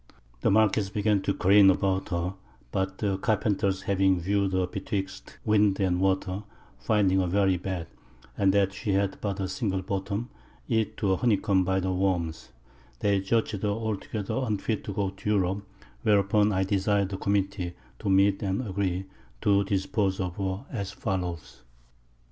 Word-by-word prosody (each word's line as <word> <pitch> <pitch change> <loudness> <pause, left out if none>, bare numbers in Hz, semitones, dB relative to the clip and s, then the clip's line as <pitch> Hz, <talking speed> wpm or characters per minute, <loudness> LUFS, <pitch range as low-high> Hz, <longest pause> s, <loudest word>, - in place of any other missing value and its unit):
The - - +2
Marquiss 105 -1 +3
began 105 -1 +1
to 100 - 0
careen 100 +1 +6
aboard 95 0 +1
her; 85 +2 -1 0.4
but 95 0 -2
the 100 -3 -1
Carpenters 100 -3 0
having 95 -2 +2
view'd 100 +2 0
her 95 0 +2
betwixt 95 0 -5
Wind 105 -2 +3
and 90 -2 +1
Water, 95 0 0 0.4
finding 100 -4 +2
her 90 - +1
very 95 0 +2
bad, 90 -1 -4 0.5
and 95 -1 +3
that 100 -1 +2
she 100 0 -2
had 100 0 0
but 100 -1 -2
a 95 - -1
single 95 -4 -2
Bottom, 100 +4 -3 0.4
eat 110 -1 0
to 100 - +1
a - - 0
Honey 120 -5 +3
comb 95 -1 +2
by 95 +1 +1
the 95 0 -1
Worms, 90 -4 -1 0.5
they 100 -1 +2
judg'd 105 0 0
her 105 - 0
altogether 110 +2 -3
unfit 110 -1 -1
to - - -4
go 100 -1 -1
to 95 +2 -6
Europe; 100 0 0 0.3
whereupon 105 +2 +3
I 95 -1 +1
desir'd 100 0 +1
the 95 - -4
Committee 100 -3 -1 0.2
to - - -2
meet 95 +1 +4
and 100 +5 -1
agree 95 -1 -1 0.4
to 100 -1 +3
dispose 95 0 0
of 90 -2 -3
her, 95 +4 -3
as 100 -7 -4
follows. 85 - -4
95 Hz, 165 wpm, -27 LUFS, 95-100 Hz, 0.5 s, careen